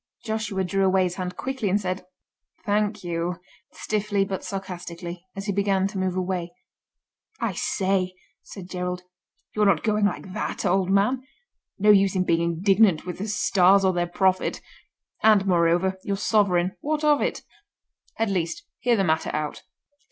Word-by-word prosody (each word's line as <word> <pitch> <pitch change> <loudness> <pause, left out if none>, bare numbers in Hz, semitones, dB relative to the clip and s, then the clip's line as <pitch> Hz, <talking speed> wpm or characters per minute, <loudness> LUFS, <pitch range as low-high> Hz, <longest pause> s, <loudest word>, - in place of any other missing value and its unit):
Joshua 215 -3 -2
drew 195 +2 0
away 190 0 +3
his 180 -1 -1
hand 180 -1 -4
quickly, 260 -6 -2
and 200 +3 +2
said, 185 -2 -4 0.6
"Thank 210 -1 0
you!" 175 0 -2 0.4
stiffly 205 -2 -1
but 190 -1 -4
sarcastically, 180 -2 -6
as 195 0 -5
he 205 - 0
began 195 -1 +1
to 200 - -5
move 185 -1 -1
away. 180 -1 -3 0.8
"I - - -1
say!" 185 -2 0 0.3
said 190 -3 -10
Gerald, 180 -1 -4 0.5
"you're 210 -1 +2
not 175 -6 +3
going 210 -1 +2
like 190 -2 -3
that, - - -3
old 190 0 +2
man; 205 +7 +2 0.6
no 210 +1 +5
use 195 -2 +4
in 185 - +2
being 170 -2 +1
indignant 180 +1 +3
with 180 0 -6
the 205 - -3
Stars 195 -2 +4
or 190 - +3
their 175 0 0
prophet—and, 190 +2 0
moreover, 175 +1 +2
your 200 -1 -2
sovereign—what 205 - +1
of 295 -1 +4
it? - - -2 0.7
At 225 -2 0
least, 165 -3 -2 0.2
hear 245 -1 +2
the 195 - +1
matter 160 -2 +1
out." 150 0 -3
190 Hz, 155 wpm, -25 LUFS, 180-205 Hz, 0.8 s, no